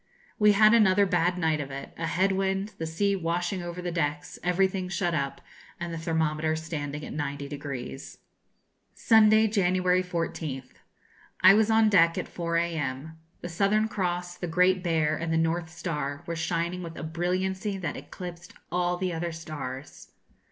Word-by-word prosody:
We 210 -1 +6
had 215 +2 +6
another 205 -3 +5
bad 180 -1 +1
night 160 -3 +1
of 140 - -6
it 140 0 -7
a 165 - -3
head 190 +4 +2
wind, 195 +2 -1
the 160 - -2
sea 200 +5 +1
washing 175 +1 -1
over 175 +1 -6
the 175 - -2
decks, 150 -3 -2
everything 185 +1 +1
shut 175 -2 -1
up, 140 -3 -2 0.4
and 170 -1 -4
the - - -4
thermometer 160 -1 0
standing 150 -2 -5
at - - -7
90°. 140 -2 -5 0.8
Sunday, 220 -1 +5
January 185 -3 +2
14th. 160 -7 -4 0.7
I 185 +1 +9
was 220 +1 +3
on 220 0 +5
deck 170 -5 +4
at - - -3
4 170 -1 -2
a.m. 160 -2 -3 0.2
The 175 - -5
Southern 200 +5 +2
Cross, 180 -3 -2
the 175 - -3
Great 180 +2 +3
Bear, 160 -3 +1
and 165 +1 -3
the 160 - +2
North 165 +1 0
Star, 150 -3 -4
were 170 -1 -3
shining 170 +2 -2
with 165 -2 -8
a - - -6
brilliancy 185 +5 -2
that 180 -3 -4
eclipsed 175 -1 -9 0.2
all 180 0 0
the 180 -1 -2
other 170 +1 -3
stars. 150 -5 -8
170 Hz, 165 wpm, -27 LUFS, 160-185 Hz, 0.8 s, I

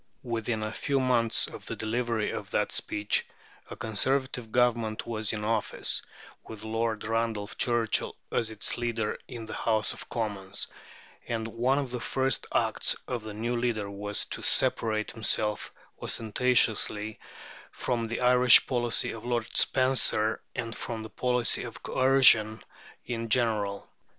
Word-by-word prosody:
Within 115 -2 -2
a 110 0 -4
few 140 +3 -1
months 120 -3 +2
of - - -10
the - - -3
delivery 115 -1 -1
of - - -6
that - - 0
speech 105 0 -1 0.5
a - - -7
Conservative 125 +2 -1
Government 120 -3 +1
was 110 -3 -2
in 105 -1 -4
office, 110 0 +1 0.4
with 110 -2 -10
Lord 115 0 -2
Randolph 115 -2 -2
Churchill 120 -3 +1 0.2
as 115 - 0
its 110 +2 -1
leader 115 -3 -2
in 120 -3 -8
the 110 - -8
House 110 -2 0
of - - -11
Commons; 100 -4 -3 0.6
and 115 -1 -2
one 120 +4 0
of 135 -3 -2
the 125 - -3
first 135 +2 -1
acts - - +2
of 125 -2 -3
the 105 -1 -8
new 120 +3 -2
leader 115 -4 -1
was 105 +1 -3
to - - -4
separate 110 -1 +1
himself 110 -1 -1 0.3
ostentatiously 110 -2 +1 0.5
from 115 -2 -2
the 120 +2 -4
Irish 125 -1 +7
policy 120 -2 -1
of 115 - -9
Lord 120 -1 -3
Spencer 130 -4 +4
and 115 -3 -4
from 115 -2 -5
the 110 - -9
policy 125 0 0
of - - -9
coercion 125 -5 +5 0.4
in 115 -1 -4
general. 105 -4 +1
115 Hz, 145 wpm, -28 LUFS, 110-120 Hz, 0.6 s, Irish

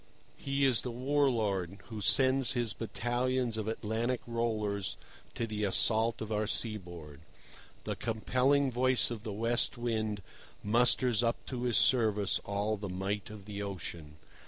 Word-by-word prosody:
He 140 0 0
is 130 -4 +3
the 125 - -4
war 135 +4 +1
lord 100 -6 -1
who 110 -2 -6
sends 130 +3 +5
his 120 -4 0
battalions 120 +2 -1
of 110 -1 -3
Atlantic 115 +3 -1
rollers 110 -4 -1 0.4
to 115 - -1
the 105 -1 -3
assault 110 +3 +2
of 110 - -7
our 105 0 0
seaboard. 85 -10 -4 0.6
The - - -3
compelling 130 +5 +1
voice 125 0 +2
of 115 -3 -5
the 110 -1 -5
West 115 +5 0
Wind 110 -4 -2 0.4
musters 120 +1 +3
up 115 -1 -1
to 125 -2 -4
his 120 -2 +2
service 105 -5 +3
all 100 +2 -1
the 100 -1 -6
might 95 +2 -3
of 105 -2 -10
the 105 -1 -6
ocean. 85 -6 -6
110 Hz, 150 wpm, -31 LUFS, 105-125 Hz, 0.6 s, sends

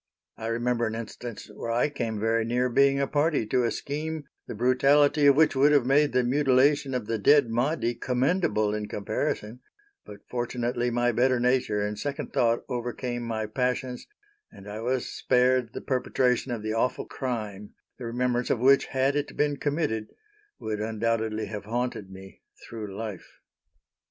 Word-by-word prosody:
I 110 - -6
remember 120 0 0
an 110 - -4
instance 115 0 -7
where 115 - -6
I 115 +4 +2
came 115 -6 -3
very 115 +1 +1
near 125 +2 0
being 140 +2 +3
a 140 - +2
party 145 -2 +1
to 125 +3 +1
a - - +2
scheme, 155 +4 -4 0.2
the - - -6
brutality 140 +5 +4
of 140 - +7
which 155 -1 +4
would 140 +3 +5
have 145 -4 +4
made 145 +3 +3
the 125 0 +2
mutilation 135 +1 +2
of 125 -4 -2
the 115 0 -2
dead 140 +2 +5
Mahdi 120 0 0
commendable 125 - 0
in 105 -1 -3
comparison; 105 +3 -3 0.4
but 105 - -12
fortunately 120 0 -2
my 120 0 +1
better 125 +2 +2
nature 125 -4 +1
and 105 0 -4
second 145 -1 -4
thought 115 -1 +1
overcame 120 -1 -3
my 115 -2 -3
passions, 125 +2 -2 0.4
and 100 - -13
I 105 +1 -6
was 125 +1 -1
spared 125 -1 +2
the - - -6
perpetration 125 -1 0
of 115 -3 -4
the 110 0 -2
awful 125 +3 0
crime, 105 -6 -5 0.2
the 125 - -6
remembrance 125 +1 -1
of - - +2
which, 135 +4 +4
had 135 +1 +1
it 145 0 -3
been 145 -1 +1
committed, 145 -8 -1 0.5
would 110 -1 -4
undoubtedly 110 0 -1
have 105 -1 -7
haunted 120 -3 -3
me 95 0 -12 0.3
through 105 -4 -7
life. 105 -4 -7
120 Hz, 165 wpm, -27 LUFS, 110-135 Hz, 0.5 s, of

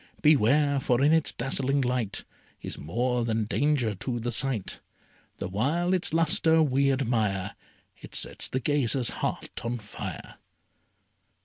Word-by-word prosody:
Beware! 140 0 +4
for 125 0 +1
in 150 +2 +5
its 160 -1 +2
dazzling 135 +2 -1
light 125 -5 -1 0.4
Is - - -6
more 120 - -1
than 115 -1 0
danger 135 -2 +1
to 120 +5 -4
the 120 +1 -3
sight. 120 -3 -1 0.6
The - - -4
while 145 - 0
its 185 -1 +1
lustre 160 0 +4
we 140 -1 +2
admire 110 -7 -1 0.4
It - - -11
sets - - -2
the 130 - -2
gazer's 135 -3 +1
heart - - -4
on 120 +1 -2
fire. 105 -2 -8
130 Hz, 135 wpm, -27 LUFS, 115-145 Hz, 0.6 s, in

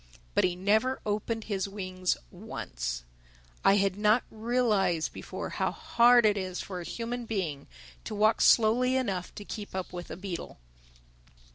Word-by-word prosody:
But - - +3
he 180 -1 0
never 215 +8 +2
opened 215 +2 -1
his 200 -2 -2
wings 185 -2 -2
once. - - -5 0.6
I 195 - +6
had 195 -1 +1
not 215 +3 +4
realized 215 -7 +1
before - - -6
how - - 0
hard 240 0 +5
it 205 -1 +3
is 185 -1 -4
for 185 -2 -5
a - - -5
human 235 +5 -4
being 170 -10 -3 0.4
to 215 - -4
walk 215 +2 +3
slowly 245 +3 +5
enough 195 -9 -2
to 205 - -8
keep 205 -3 -7
up 185 -1 -4
with 175 -1 -6
a - - -6
beetle. 185 -2 -6
205 Hz, 155 wpm, -29 LUFS, 185-225 Hz, 0.6 s, I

